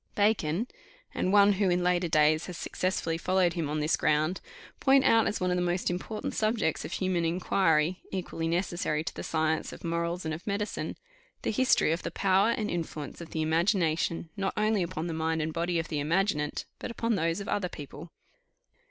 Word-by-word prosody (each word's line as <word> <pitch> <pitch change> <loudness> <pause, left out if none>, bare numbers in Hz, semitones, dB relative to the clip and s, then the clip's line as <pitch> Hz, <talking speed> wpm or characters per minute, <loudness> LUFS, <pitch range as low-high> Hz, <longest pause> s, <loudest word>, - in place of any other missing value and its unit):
Bacon, 205 -1 +1 0.5
and 185 - 0
one 205 0 +6
who 195 -1 +1
in 175 0 +1
later 180 0 +2
days 155 0 +3
has 180 - -6
successfully 165 -3 -2
followed 185 -1 +2
him 165 -5 -2
on 150 +1 -1
this 150 +2 +2
ground, 155 +4 +1 0.4
point 270 0 +5
out 225 0 +4
as - - -1
one 180 0 0
of 180 - +1
the - - +1
most 175 0 0
important 200 +4 -4
subjects 215 -7 0
of - - -6
human 185 -2 0
inquiry, 170 0 +1
equally 175 -3 -3
necessary 170 -3 -1
to - - -5
the - - -6
science 160 0 0
of - - -11
morals 170 +1 -2
and 160 - -1
of 165 +6 -8
medicine, 205 +1 -3 0.5
"The - - 0
history 255 -7 +3
of 165 - -1
the - - -3
power 195 +2 +3
and 230 -3 0
influence 160 -5 -4
of 170 - -8
the 160 - -2
imagination, 165 -1 +1
not 195 -2 -2
only 215 -1 +2
upon 165 -2 -3
the 170 - -3
mind 160 0 -1
and 155 0 -2
body 170 +1 0
of 165 0 -2
the 150 - -1
imaginant, 155 -1 0
but - - -5
upon 230 0 -1
those 165 -2 0
of 200 - -6
other 195 -3 -1
people." 150 +3 -9
175 Hz, 195 wpm, -29 LUFS, 160-195 Hz, 0.5 s, one